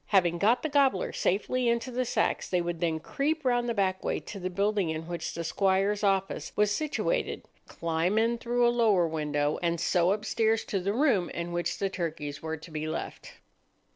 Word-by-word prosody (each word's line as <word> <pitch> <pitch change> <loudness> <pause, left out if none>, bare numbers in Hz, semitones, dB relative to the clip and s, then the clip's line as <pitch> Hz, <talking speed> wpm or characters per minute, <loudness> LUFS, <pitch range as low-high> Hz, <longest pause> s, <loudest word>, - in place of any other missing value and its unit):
Having 175 -4 +3
got 225 +7 +3
the - - +1
gobblers 275 -9 +2
safely 240 +6 +1
into 235 +2 -1
the 250 +1 -1
sacks, - - 0
they 180 - +2
would 170 -1 -3
then 165 -2 0
creep 295 - -2
round 245 -1 +2
the - - +1
back 190 -2 0
way - - -1
to 200 - -8
the 185 0 -3
building 200 -1 0
in 160 +1 -4
which 170 -1 -4
the 170 - -3
squire's 195 +4 +1
office 195 -1 0
was 210 0 +3
situated, 310 - -1 0.2
climb 170 +4 -1
in 230 +1 +2
through 240 0 +2
a 240 - +3
lower 210 -8 +3
window, 150 -2 -1
and 170 -1 0
so 175 +1 +2
upstairs 220 +2 +1
to 195 - -1
the 190 +2 -1
room 230 - +2
in 170 0 -4
which 175 -1 -2
the 195 - 0
turkeys 160 -6 -4
were 160 0 -3
to 160 +2 -13
be 155 0 -3
left. 155 - -5
195 Hz, 200 wpm, -28 LUFS, 170-230 Hz, 0.2 s, Having